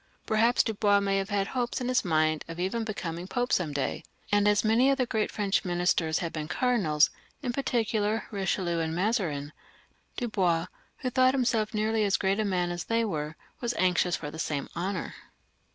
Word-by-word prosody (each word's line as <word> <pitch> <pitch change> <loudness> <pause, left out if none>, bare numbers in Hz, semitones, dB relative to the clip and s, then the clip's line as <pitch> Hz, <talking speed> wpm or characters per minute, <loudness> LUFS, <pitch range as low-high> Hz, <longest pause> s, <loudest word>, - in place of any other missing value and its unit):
Perhaps 230 +3 +3
Dubois 205 -2 +2
may 195 -1 +1
have 195 - -3
had 200 -1 +1
hopes 245 -2 -2
in 250 - -3
his 255 -1 +2
mind 155 -3 +1
of 165 +1 -7
even 195 +6 -1
coming 175 -4 -4
to - - -20
be - - -12
Pope 245 0 +1
some 170 -5 +1
day; 140 -1 -2 0.3
and 205 0 +4 0.2
many 230 +5 +4
of 275 - +3
the 255 - +1
great 220 -3 -1
French 205 -2 0
ministers 175 -3 +1
had 170 -2 -3
been 155 -1 -4
cardinals, 185 -13 +2 0.3
in 245 -2 -1
particular, 225 -4 0
Eichelieu 190 -4 -1
and 160 0 -1
Mazarin, 190 - 0
and 145 +1 -7 0.7
Dubois, 185 -9 +1 0.4
who 255 - -1
thought 255 +1 +4
himself 230 -4 +1
nearly 215 +1 +1
as 200 -2 +2
great 195 +2 +1
a - - +2
man 180 -3 0
as 175 0 -4
they 230 0 +1
were, 155 -6 -3 0.2
was 240 -1 -2
anxious 180 -1 +2
for 150 -2 -6
the 160 - -9
same 145 -4 -2
honour. 185 +3 -3
200 Hz, 195 wpm, -28 LUFS, 170-230 Hz, 0.7 s, and